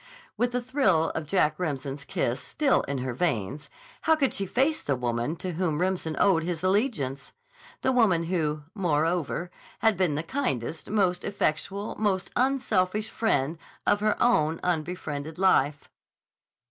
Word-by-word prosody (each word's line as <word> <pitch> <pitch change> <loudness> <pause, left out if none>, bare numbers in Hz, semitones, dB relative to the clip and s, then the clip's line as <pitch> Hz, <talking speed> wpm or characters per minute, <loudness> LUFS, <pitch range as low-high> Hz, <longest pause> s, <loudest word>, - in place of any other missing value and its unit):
With 245 0 +1
the 245 0 -1
thrill 220 - +2
of 160 -2 -4
Jack 155 -3 +2
Remsen's 140 -4 -3
kiss 125 -2 -1
still 295 -3 +2
in 140 - -3
her 130 -1 -3
veins, 130 - -2 0.3
how 320 - +4
could 280 -4 +1
she 195 -2 -2
face 275 - +1
the 140 - 0
woman 120 +4 -1
to 180 +2 -4
whom 160 -3 -1
Remsen 180 -3 0
owed 190 -5 +4
his 170 0 -3
allegiance, 185 - 0 0.5
the 260 - +3
woman 210 -10 +3
who, 155 -4 -1
moreover, 170 -1 0 0.3
had 220 -4 +2
been 175 -6 +2
the 155 - -2
kindest, 165 - -2
most 190 -4 +1
effectual, 200 +1 -1
most 195 -3 0
unselfish 220 -6 +1
friend 160 -8 0 0.3
of 205 - +3
her 210 0 +1
own 165 -10 +3
unbefriended 160 -3 -3
life? 150 -6 +2
175 Hz, 145 wpm, -27 LUFS, 150-205 Hz, 0.5 s, how